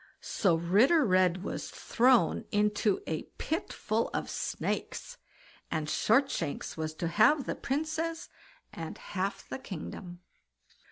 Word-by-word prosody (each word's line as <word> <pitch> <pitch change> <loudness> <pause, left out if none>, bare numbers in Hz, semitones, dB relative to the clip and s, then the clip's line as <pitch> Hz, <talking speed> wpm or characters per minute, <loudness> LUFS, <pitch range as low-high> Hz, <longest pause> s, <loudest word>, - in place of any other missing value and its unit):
So 190 -6 +2
Ritter 215 - +4
Red 185 -2 +3
was - - -4
thrown 250 +1 +3
into 210 0 +2
a 160 -1 -2 0.2
pit 320 +2 -2
full 220 +2 -1
of - - -2
snakes, - - -3 0.5
and 155 -2 -2
Shortshanks 220 - +1
was 155 0 -3
to 170 - -2
have 235 - +4
the - - -1
Princess 320 +4 -2 0.5
and 165 -1 -6
half 195 +1 -3
the - - -5
kingdom. 175 -3 -7
210 Hz, 120 wpm, -30 LUFS, 175-270 Hz, 0.5 s, Ritter